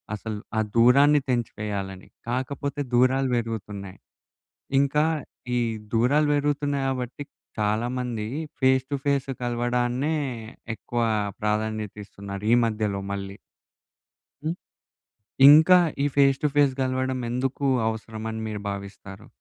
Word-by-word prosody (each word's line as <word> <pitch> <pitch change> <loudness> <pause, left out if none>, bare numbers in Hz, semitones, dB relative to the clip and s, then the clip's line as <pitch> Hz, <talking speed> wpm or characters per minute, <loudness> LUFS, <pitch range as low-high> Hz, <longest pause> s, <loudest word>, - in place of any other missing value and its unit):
అసలు 105 0 -5 0.2
ఆ - - +3 0.2
దూరాన్ని 140 +5 +6
తెంచేయాలని. 105 -5 -3 0.2
కాకపోతే 140 +3 -2
దూరాలు 130 +2 +3
పెరుగుతున్నాయి. 105 -4 -5 0.8
ఇంకా 145 +2 +2 0.5
ఈ - - +2 0.4
దూరాలు 140 +7 +3
పెరుగుతున్నాయి 145 -1 0
కాబట్టి, 130 +1 -4 0.4
చాలామందీ 115 +1 -1 0.3
ఫేస్ 130 -1 +4
టు - - +1
ఫేస్ 140 -1 +1
కలవడాన్నే 120 +4 0 0.6
ఎక్కువ 120 +3 -3 0.4
ప్రాధాన్యత 105 0 -1
ఇస్తున్నారు, 100 0 -8
ఈ - - +7
మధ్యలో 105 -3 -1
మళ్ళీ. 100 0 -6 1.1
హ్మ్. 160 +2 -1 0.9
ఇంకా 160 +5 +8 0.3
ఈ - - +3
ఫేస్ 135 -1 +4
టు - - +4
ఫేస్ 145 -2 +4
గలవడం 130 0 -1
ఎందుకు 130 +3 -2 0.2
అవసరమని 110 0 -4
మీరు 105 -1 -5
భావిస్తారు? 100 +1 -8
120 Hz, 105 wpm, -25 LUFS, 105-135 Hz, 1.1 s, ఇంకా